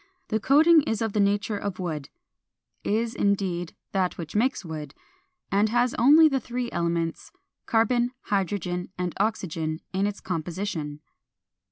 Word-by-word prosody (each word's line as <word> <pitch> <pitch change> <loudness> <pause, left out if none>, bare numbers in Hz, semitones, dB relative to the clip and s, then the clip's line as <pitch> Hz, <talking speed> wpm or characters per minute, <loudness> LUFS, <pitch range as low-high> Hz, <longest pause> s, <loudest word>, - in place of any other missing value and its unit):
The 220 - +1
coating 310 +7 +6
is 225 -6 -2
of 220 -2 -2
the 210 - +1
nature 205 +1 +1
of 200 -2 -4
wood 160 -6 -4 0.7
(is, 225 +2 0
indeed, 190 -5 0 0.2
that 185 -2 0
which 165 0 -7
makes 235 -2 +1
wood), 155 -3 -6 0.6
and 205 +2 +3
has 240 +2 +2
only 300 +7 +7
the 275 -3 +1
three 245 -1 -4
elements, 170 -1 -2 0.4
Carbon, 240 +1 +2
Hydrogen, 180 -2 -2
and 180 -1 -2
Oxygen, 165 -7 -1
in 195 +2 +1
its 205 -1 -4
composition. 165 -3 -4
200 Hz, 140 wpm, -26 LUFS, 170-225 Hz, 0.7 s, only